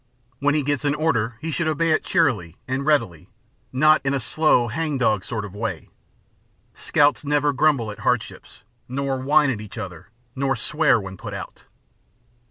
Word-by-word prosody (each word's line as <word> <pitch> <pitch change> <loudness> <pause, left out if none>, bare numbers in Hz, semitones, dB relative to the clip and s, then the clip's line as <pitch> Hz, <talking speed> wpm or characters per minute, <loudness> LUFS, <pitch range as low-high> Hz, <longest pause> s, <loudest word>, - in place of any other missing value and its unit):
When 145 +1 +2
he 150 - +1
gets 145 0 -1
an 145 0 +1
order 120 -8 0
he 160 +1 -3
should 165 +1 -1
obey 160 +1 +1
it 155 - +2
cheerily 105 - 0
and 130 +2 -2
readily, 95 - 0 0.4
not 155 +4 +4
in 140 0 0
a - - 0
slow, 125 0 +2
hang 150 +5 -2
dog 110 -6 +1
sort 110 -3 -4
of 100 - -10
way. 100 -5 -4 0.8
Scouts 145 0 +2
never 145 0 +1
grumble 135 -6 +2
at 105 - -11
hardships, - - -3 0.3
nor 135 0 -2
whine 145 +1 +3
at 110 -5 -4
each 105 0 -10
other, 90 -6 -7 0.3
nor 135 0 0
swear 130 +1 +2
when 95 -2 -8
put - - -7
out. - - -9
135 Hz, 175 wpm, -23 LUFS, 110-150 Hz, 0.8 s, not